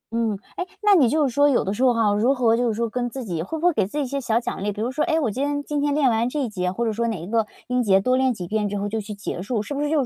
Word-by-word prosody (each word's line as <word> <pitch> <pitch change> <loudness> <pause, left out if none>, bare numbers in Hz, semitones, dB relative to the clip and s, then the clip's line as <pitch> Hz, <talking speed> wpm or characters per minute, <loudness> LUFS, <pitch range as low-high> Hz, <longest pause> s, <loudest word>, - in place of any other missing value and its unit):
嗯， 225 -3 0 0.2
诶， 365 - -3 0.2
那 415 -1 +6
你 275 -11 +5
就 305 -1 +2
是 250 - -5
说 285 +2 +4
有 255 - +2
的 195 - -2
时 245 - -1
候 255 - +6
哈， 225 -3 +2
如 235 +7 +2
何 230 -3 +3
就 245 0 +1
是 225 - 0
说 235 +1 0
跟 245 +2 -2
自 260 0 -6
己 170 -5 -3
会 320 - -4
不 325 - -3
会 355 - +5
给 190 - +1
自 290 - -7
己 290 - +1
一 - - -2
些 275 +2 -3
小 230 -2 +1
奖 235 - -5
励？ 205 - 0
比 205 - -8
如 240 +4 -1
说， 300 +3 0
诶， 320 -1 +1
我 240 -9 0
今 265 +7 -2
天 285 0 -1
今 290 0 -2
天 290 -1 +1
练 295 -3 +3
完 230 0 +2
这 300 - -5
一 240 - -2
节， 180 -3 -2
或 235 +5 -2
者 220 - 0
说 235 +2 -1
哪 220 -6 -2
一 165 - -7
个 220 +2 0 0.2
音 250 0 +1
节 195 -4 +4
多 255 +6 +1
练 260 0 +2
几 185 -6 -5
遍 210 0 -1
之 205 - -3
后 200 +1 -2
就 220 +1 -2
去 210 0 -7
结 200 -3 -5
束， 215 +1 -2
是 225 - -6
不 285 - -2
是 295 - 0
就 295 -4 +2
235 Hz, 400 characters per minute, -23 LUFS, 210-280 Hz, 0.2 s, 那